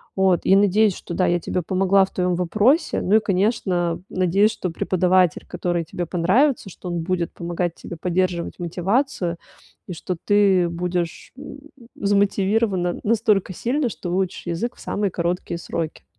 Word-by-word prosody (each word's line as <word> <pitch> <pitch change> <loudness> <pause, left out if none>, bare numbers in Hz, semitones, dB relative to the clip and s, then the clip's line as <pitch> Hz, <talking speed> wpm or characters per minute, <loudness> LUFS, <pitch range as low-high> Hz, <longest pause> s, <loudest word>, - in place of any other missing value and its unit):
вот. 190 -2 +3
И - - +4
надеюсь, 205 0 +3
что, - - -8
да, 185 +2 +1
я 175 0 +2
тебе 180 +2 -2
помогла 190 +3 +3
в 190 - -4
твоем 180 -1 0
вопросе. 215 - +2
Ну 200 - +2
и, - - +7
конечно, 185 -4 0
надеюсь, 190 +4 +2
что 185 - -4
преподаватель, 180 +1 +1
который 175 -1 -2
тебе 175 +2 -4
понравится, 195 - +1
что 180 0 -9
он 175 -1 -2
будет 175 -1 -1
помогать 175 0 -3
тебе - - -9
поддерживать 175 +1 -1
мотивацию, 180 - -1 0.5
и 180 - -5
что 175 +1 -5
ты 200 -4 +4
будешь, 175 0 -3
м, 285 +1 -9 0.4
замотивирована 200 -2 +1
настолько 210 -3 +1
сильно, 255 - -1
что 180 - -6
выучишь 185 0 -2
язык 175 +9 -3
в - - -16
самые 205 -1 -1
короткие 170 0 -2
сроки. 165 -1 -5
185 Hz, 155 wpm, -22 LUFS, 175-205 Hz, 0.5 s, и